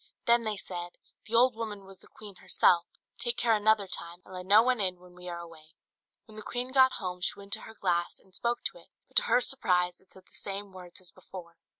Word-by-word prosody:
Then 235 0 +6
they 215 -1 -1
said, 175 -2 -7 0.3
"The 230 - -2
old 250 +1 +5
woman 210 -3 -6
was 195 -1 -11
the - - -18
queen 205 -3 -10
herself; 170 -1 +3 0.3
take 240 0 0
care 240 -2 +3
another 215 -1 +3
time, 175 0 -5
and 185 - -13
let 180 0 -6
no 210 +3 +7
one 250 -1 +2
in 185 -2 0
when 180 0 -17
we 180 0 -9
are 170 - -5
away." 165 -2 -12 0.5
When 215 - -15
the - - -6
queen 245 +4 -3
got 260 -1 +5
home, 180 -3 -4
she - - 0
went 200 0 -4
to 220 - +2
her 220 - -13
glass, 175 -3 -1
and 190 - -25
spoke 240 +4 -1
to - - -3
it, - - -19 0.2
but - - -1
to - - +10
her 250 - +3
surprise 180 -10 +1
it 190 - -28
said 190 -1 -17
the - - -25
same 200 0 -4
words 180 -1 -10
as 180 - -7
before. 170 -3 -12
195 Hz, 245 wpm, -29 LUFS, 180-225 Hz, 0.5 s, to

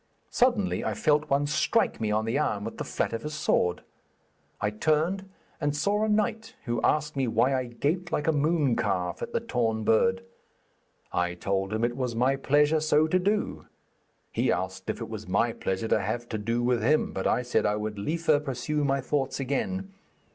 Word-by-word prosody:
Suddenly 240 -6 +2
I - - -1
felt 150 0 +2
one 140 +1 +2
strike 150 - +1
me 110 - 0
on 110 +1 +1
the 115 +6 0
arm 105 -9 0
with 115 - -6
the - - -1
flat - - -2
of 115 - -3
his 150 +3 -5
sword. 90 - +1 0.8
I 105 0 0
turned 160 - 0 0.3
and 145 0 0
saw 205 +7 +1
a 220 - +1
knight, 215 +1 0
who 120 -2 -1
asked 150 0 +1
me 135 -2 0
why 120 +4 +2
I 130 -1 0
gaped 160 +9 -2
like 150 - 0
a - - +5
mooncalf 140 - 0
at - - -4
the - - 0
torn 115 -2 -1
bird. 95 -4 +3 0.9
I 90 0 0
told 95 +2 -1
him 110 +1 -1
it 120 0 +1
was 125 -3 -2
my 130 +4 +2
pleasure 145 +3 +3
so 155 0 +3
to 180 +4 +2
do. 205 +3 -1 0.6
He - - +1
asked 95 0 -3
if - - -2
it - - -5
was - - -7
my - - +1
pleasure 95 +4 -3
to - - +3
have 115 +4 -3
to 110 - -3
do 115 +3 -1
with 120 -1 +2
him, 150 +8 +2
but 95 - -1
I 125 - +1
said 125 - +1
I 105 - +1
would 105 -1 -4
liefer 155 +5 +1
pursue 145 +1 -2
my 135 -1 +1
thoughts 135 0 -1
again. 190 +9 -2
135 Hz, 200 wpm, -27 LUFS, 110-155 Hz, 0.9 s, a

